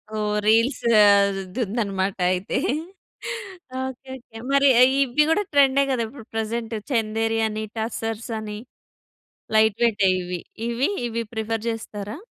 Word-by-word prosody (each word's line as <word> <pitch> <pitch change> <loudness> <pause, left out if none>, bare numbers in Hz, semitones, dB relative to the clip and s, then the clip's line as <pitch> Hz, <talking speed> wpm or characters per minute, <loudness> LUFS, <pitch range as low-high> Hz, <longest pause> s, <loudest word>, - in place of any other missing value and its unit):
ఓహ్! 210 -1 -1
రీల్సా 230 0 +3 0.4
ద్ - - -3 0.2
దుందనమాట 200 -4 -1 0.2
అయితే. 185 +3 -2 1.3
Okay. 265 0 -8
Okay. 235 -3 -13
మరి 280 0 +5
ఏ - - +10 0.2
ఇవ్వి 275 +3 +2
గూడా 415 +6 +2
ట్రెం‌డే 275 -1 +5
గదా 245 -3 0
ఇప్పుడు 240 -1 -12
ప్రెజెంట్. 225 +1 -2 0.2
చెందేరి 225 -1 0
అనీ, 215 0 -4
టస్సర్సని. 220 -1 -4 1.0
లైట్ 220 -1 +4
వెయి‌టే 205 -5 +3
ఇవి. 180 0 -4 0.3
ఇవీ 245 +7 0 0.2
ఇవి 230 0 -3
ప్రిఫర్ 220 0 -2
చేస్తారా? 210 -1 -5
225 Hz, 120 wpm, -23 LUFS, 215-240 Hz, 1.3 s, ఏ